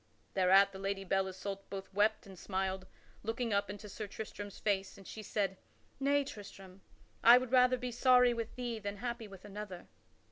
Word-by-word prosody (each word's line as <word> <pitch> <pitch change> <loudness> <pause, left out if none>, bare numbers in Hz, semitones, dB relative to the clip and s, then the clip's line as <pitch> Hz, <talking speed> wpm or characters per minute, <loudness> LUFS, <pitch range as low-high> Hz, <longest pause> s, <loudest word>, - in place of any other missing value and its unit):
Thereat 195 +1 +5
the 190 - -9
Lady 195 0 -2
Belle 195 0 +1
Isoult 195 +1 -6
both 195 0 -7
wept 210 +2 +2
and 195 -1 -11
smiled, 190 0 -2 0.3
looking 225 +1 -2
up 200 -1 +1
into 205 +1 -7
Sir 210 +1 -6
Tristram's 205 -1 -7
face, 195 -2 -1
and 195 - -13
she 220 - -7
said: 200 -2 -1 0.4
"Nay, 285 +1 +3
Tristram; 195 -6 -10 0.4
I 240 +2 +10
would 250 -1 -2
rather 255 0 +5
be 250 0 -4
sorry 250 0 +5
with 230 -1 -4
thee 240 -3 -3
than 205 -1 -5
happy 235 0 -4
with 195 -2 -12
another." 205 -3 -8
205 Hz, 180 wpm, -34 LUFS, 195-235 Hz, 0.4 s, I